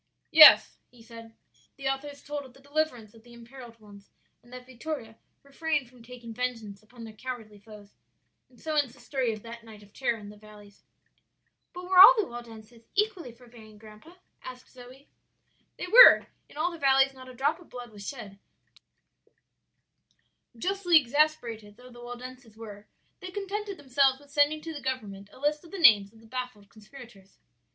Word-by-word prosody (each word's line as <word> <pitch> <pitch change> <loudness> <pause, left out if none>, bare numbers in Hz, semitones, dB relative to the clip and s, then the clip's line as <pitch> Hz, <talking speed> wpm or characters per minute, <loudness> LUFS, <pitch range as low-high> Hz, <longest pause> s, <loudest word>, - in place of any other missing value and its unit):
"Yes," 315 -1 +8
he 240 -2 -20
said, 230 -1 -14 0.4
"the 275 -1 -5
author 270 +2 -3
has 285 -1 -12
told 290 -1 -6
of 260 -2 -16
the - - -18
deliverance 280 -6 -4
of 225 - -18
the 240 +1 -18
imperilled 235 0 -14
ones, 205 -2 -17 0.3
and 240 - -22
that 250 0 -11
Vittoria 255 -2 -8 0.3
refrained 295 -1 -3
from 250 -1 -20
taking 235 -1 -11
vengeance 225 -5 -5
upon 230 +2 -15
their 220 -1 -10
cowardly 220 -3 -9
foes; 205 -1 -16 0.6
and 250 - -24
so 315 - -5
ends 290 -5 -1
the - - -21
story 260 -4 -3
of 215 -1 -9
that 235 0 -11
night 215 -2 -15
of 200 0 -21
terror 240 -3 -2
in 205 -2 -12
the 210 - -14
valleys." 205 -1 -18 0.9
"But 360 - -10
were 365 0 +2
all - - +11
the 425 - +1
Waldenses 230 -1 -13
equally 400 - -2
forbearing, 230 -3 -17
grandpa?" 215 +10 -16 0.3
asked 255 -1 -12
Zoe. 255 +2 -16 0.7
"They - - -5
were; 475 +7 +8 0.2
in - - -17
all 335 +4 -1
the 335 - -11
valleys 270 -1 +3
not 260 -1 -14
a 255 - -13
drop 290 +6 -1
of 350 - -19
blood 245 -2 -10
was 205 -1 -11
shed; 205 -7 -10 2.2
justly 360 +3 +2
exasperated 240 -7 -2
though 250 0 -16
the 240 0 -14
Waldenses 245 -2 -11
were, 210 -2 -12 0.3
they 370 - -9
contented 405 +1 -6
themselves 270 0 +1
with 285 0 -21
sending 295 +2 +1
to 325 +1 -8
the 290 - -8
government 210 -7 -6
a - - -17
list 295 +2 -1
of 335 - -16
the 395 - -8
names 210 - +5
of 225 0 -21
the - - -19
baffled 235 -4 -8
conspirators. 215 -3 -16
250 Hz, 180 wpm, -27 LUFS, 225-290 Hz, 2.2 s, all